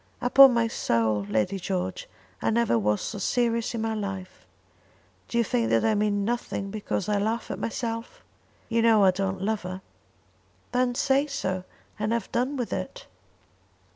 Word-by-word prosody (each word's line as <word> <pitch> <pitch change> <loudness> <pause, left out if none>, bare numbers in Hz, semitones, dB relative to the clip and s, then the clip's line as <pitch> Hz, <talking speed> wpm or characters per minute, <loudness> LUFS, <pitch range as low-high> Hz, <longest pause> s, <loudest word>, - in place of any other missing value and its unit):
"Upon 260 +1 +7
my 235 -1 +3
soul, 110 - 0
Lady 110 - 0
George, 185 0 -3 0.3
I - - +1
never 230 - +2
was 105 0 +1
so 210 - -4
serious 235 +2 0
in 225 - -2
my 225 0 -1
life. 195 -3 -6 0.8
Do 235 - -3
you 235 - +4
think 115 - 0
that 115 0 +2
I 220 - +3
mean 205 -1 +1
nothing 220 -4 -3
because 205 -3 -3
I 210 -1 +1
laugh 220 +3 -2
at - - -5
myself? 230 - -4 0.4
You 230 0 +1
know 225 -3 +5
I 190 - +6
don't 190 0 -2
love 215 +1 0
her." 185 +1 -7 0.9
"Then 250 0 +1
say 275 +3 +2
so, 190 -10 -3 0.3
and 215 +2 0
have 235 - -2
done 255 +4 0
with 245 -3 -3
it." - - -5
215 Hz, 170 wpm, -26 LUFS, 190-235 Hz, 0.9 s, Upon